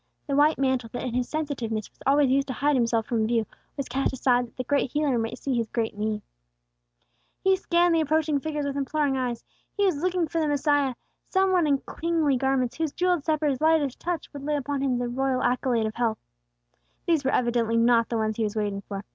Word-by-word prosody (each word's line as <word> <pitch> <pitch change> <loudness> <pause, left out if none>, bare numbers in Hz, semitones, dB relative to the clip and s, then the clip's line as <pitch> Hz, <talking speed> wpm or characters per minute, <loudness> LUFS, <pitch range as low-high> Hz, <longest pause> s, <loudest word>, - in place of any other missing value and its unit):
The 280 - -1
white 300 +2 +4
mantle, 260 -3 0
that 245 - -4
in 250 - -3
his 250 0 -1
sensitiveness 245 -9 -3
was - - -36
always 280 -1 +4
used 275 +1 +2
to 260 - -3
hide 290 +3 +1
himself 230 -2 +1
from 220 -2 0
view, 230 -1 +1 0.3
was 275 - -3
cast 270 +3 0
aside, 250 -1 +2
that - - -25
the 255 - -2
Great 280 0 +1
Healer 295 -5 +1
might 225 0 -3
see 275 - -2
his 230 -2 0
great 225 -3 -2
need. 210 0 -2 1.2
He 385 0 +4
scanned 350 -2 +2
the 325 - +3
approaching 310 -1 +1
figures 295 0 -3
with 280 -1 -3
imploring 285 0 0
eyes. 250 -3 -2 0.3
He 405 - +3
was 370 -7 +2
looking 360 -2 +1
for 330 +2 -1
the 310 - +1
Messiah, 290 -2 +1 0.3
some 380 0 +2
one 355 -4 +3
in 280 -2 +2 0.2
kingly 325 -4 +2
garments, 260 -1 0
whose 320 -3 -1
jewelled 355 -4 +1
sceptre's 305 -4 0
lightest 310 -4 +2
touch 350 -1 -3
would 285 - -7
lay 300 +1 0
upon 285 0 -2
him 260 -3 +1
the 245 0 -2
royal 260 +1 0
accolade 245 -2 +1
of 215 - -3
health. 230 -2 0 0.9
These 325 -4 +2
were 265 - +1
evidently 235 -3 +1
not 230 0 +4
the 235 - -1
ones 220 -1 -1
he 225 - 0
was 210 0 -2
waiting 205 -2 -2
for. 200 0 -7
270 Hz, 220 wpm, -26 LUFS, 240-300 Hz, 1.2 s, white